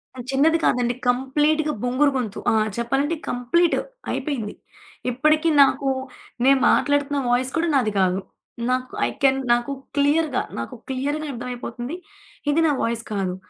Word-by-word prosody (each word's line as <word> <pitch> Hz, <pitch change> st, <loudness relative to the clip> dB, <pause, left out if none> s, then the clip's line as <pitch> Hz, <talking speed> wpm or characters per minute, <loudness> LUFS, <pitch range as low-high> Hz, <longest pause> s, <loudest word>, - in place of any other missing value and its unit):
అది 250 Hz, -2 st, -8 dB
చిన్నది 305 Hz, +5 st, +4 dB
కాదండి. 245 Hz, -1 st, +2 dB
కంప్లీట్‌గా 295 Hz, +5 st, +1 dB
బొంగురు 260 Hz, +4 st, +2 dB
గొంతు. 220 Hz, -5 st, -3 dB
ఆ! -, -, +2 dB, 0.2 s
చెప్పాలంటే 270 Hz, +7 st, 0 dB
కంప్లీట్ 260 Hz, +8 st, +2 dB, 0.3 s
అయిపోయింది. 245 Hz, -9 st, -3 dB, 0.6 s
ఇప్పడికి 310 Hz, +5 st, +2 dB
నాకు 275 Hz, 0 st, +1 dB, 0.6 s
నేను 270 Hz, 0 st, +5 dB
మాట్లాడుతున్న 285 Hz, 0 st, +1 dB
వాయిస్ 250 Hz, +2 st, +1 dB
కూడా 335 Hz, +1 st, +1 dB
నాది 245 Hz, -6 st, +2 dB
కాదు. 185 Hz, 0 st, +2 dB, 0.5 s
నాకు 255 Hz, 0 st, -2 dB
ఐ -, -, -2 dB
కెన్ 270 Hz, 0 st, +4 dB
నాకు 240 Hz, +3 st, 0 dB, 0.3 s
క్లియర్‌గా 290 Hz, 0 st, +2 dB, 0.2 s
నాకు 115 Hz, -, -5 dB
క్లియర్‌గా 285 Hz, +4 st, -2 dB
అర్థమైపోతుంది. 245 Hz, +2 st, -5 dB, 0.5 s
ఇది 300 Hz, +3 st, +3 dB
నా -, -, +3 dB
వాయిస్ 230 Hz, 0 st, -1 dB
కాదు. 190 Hz, -3 st, -1 dB
265 Hz, 135 wpm, -23 LUFS, 245-295 Hz, 0.6 s, నేను